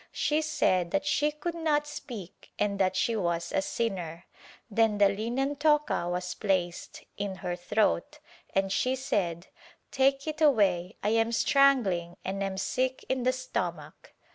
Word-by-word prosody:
She 305 Hz, +1 st, +1 dB
said 275 Hz, -, +1 dB
that 290 Hz, +7 st, 0 dB
she 295 Hz, +1 st, +2 dB
could 300 Hz, +3 st, -4 dB
not 310 Hz, -3 st, +1 dB
speak 250 Hz, -, -9 dB
and 200 Hz, -1 st, 0 dB
that 190 Hz, -1 st, +2 dB
she 230 Hz, +4 st, +1 dB
was 170 Hz, -4 st, -1 dB
a -, -, +1 dB
sinner. 180 Hz, -6 st, -3 dB, 0.4 s
Then 225 Hz, -1 st, +2 dB
the 200 Hz, -1 st, +5 dB
linen 245 Hz, +8 st, -2 dB
toca 300 Hz, -, +2 dB
was 180 Hz, 0 st, -2 dB
placed 185 Hz, -4 st, -2 dB
[in 200 Hz, -1 st, -3 dB
her 175 Hz, 0 st, -1 dB
throat] 175 Hz, -, 0 dB, 0.4 s
and 195 Hz, 0 st, +1 dB
she 255 Hz, +6 st, +1 dB
said 185 Hz, -10 st, -1 dB, 0.5 s
"Take 275 Hz, 0 st, +2 dB
it 310 Hz, 0 st, -4 dB
away, 200 Hz, -, +3 dB
I 210 Hz, -, +2 dB
am 225 Hz, +1 st, +2 dB
strangling 230 Hz, -10 st, +3 dB
and 195 Hz, +1 st, -3 dB
am 195 Hz, -1 st, -2 dB
sick 255 Hz, +6 st, -1 dB
in 260 Hz, -1 st, 0 dB
the 255 Hz, +1 st, +3 dB
stomach." 175 Hz, -12 st, -5 dB
210 Hz, 155 wpm, -29 LUFS, 185-275 Hz, 0.5 s, the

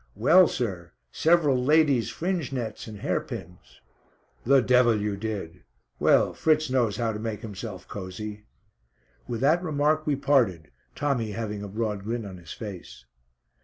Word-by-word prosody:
"Well, 165 Hz, -, +6 dB
sir, 95 Hz, -9 st, -4 dB, 0.2 s
several 150 Hz, -6 st, +3 dB
ladies' 145 Hz, -5 st, +3 dB
fringe 175 Hz, -5 st, -2 dB
nets 120 Hz, -5 st, -4 dB
and 105 Hz, -2 st, -9 dB
hair -, -, 0 dB
pins." 90 Hz, +2 st, -10 dB, 0.6 s
"The 135 Hz, +3 st, +5 dB
devil 125 Hz, -2 st, +4 dB
you 105 Hz, -1 st, -2 dB
did. 100 Hz, -5 st, -5 dB, 0.4 s
Well, -, -, +4 dB
Fritz 155 Hz, -3 st, +1 dB
knows 120 Hz, -5 st, +1 dB
how 115 Hz, -2 st, 0 dB
to 105 Hz, -, -5 dB
make 110 Hz, -1 st, -4 dB
himself 105 Hz, -3 st, -7 dB
cosy." 105 Hz, +2 st, -7 dB, 0.8 s
With 120 Hz, -1 st, -4 dB
that 155 Hz, +6 st, +3 dB
remark 155 Hz, -2 st, 0 dB
we 145 Hz, -, +2 dB
parted, 115 Hz, -, +1 dB, 0.2 s
Tommy 125 Hz, -7 st, -1 dB
having 105 Hz, -2 st, -4 dB
a 105 Hz, -, -5 dB
broad 105 Hz, -1 st, -3 dB
grin 115 Hz, +1 st, -3 dB
on 95 Hz, -2 st, -8 dB
his 85 Hz, -2 st, -12 dB
face. 100 Hz, -6 st, -9 dB
115 Hz, 150 wpm, -26 LUFS, 105-140 Hz, 0.8 s, Well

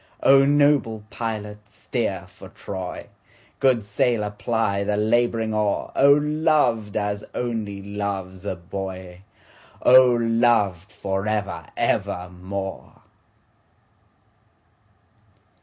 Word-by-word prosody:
O 135 Hz, 0 st, +6 dB
noble 140 Hz, -6 st, +2 dB
pilot 105 Hz, -2 st, -5 dB
steer -, -, -3 dB
for -, -, -14 dB
Troy, 95 Hz, -2 st, -7 dB, 0.5 s
Good 130 Hz, -5 st, +3 dB
sailor 105 Hz, +1 st, 0 dB
ply 105 Hz, -1 st, -1 dB
the 105 Hz, +1 st, -1 dB
labouring 115 Hz, 0 st, +1 dB
oar,O 105 Hz, +6 st, +3 dB
loved 150 Hz, -8 st, +1 dB
as 105 Hz, 0 st, -2 dB
only 110 Hz, -5 st, -3 dB
loves 100 Hz, -2 st, -5 dB
a 100 Hz, -, -3 dB
boy!O 95 Hz, +7 st, 0 dB
loved 115 Hz, -5 st, +1 dB
for 100 Hz, -1 st, -3 dB
ever 100 Hz, -7 st, -2 dB
evermore! 90 Hz, +2 st, -3 dB
105 Hz, 85 wpm, -23 LUFS, 100-120 Hz, 0.5 s, O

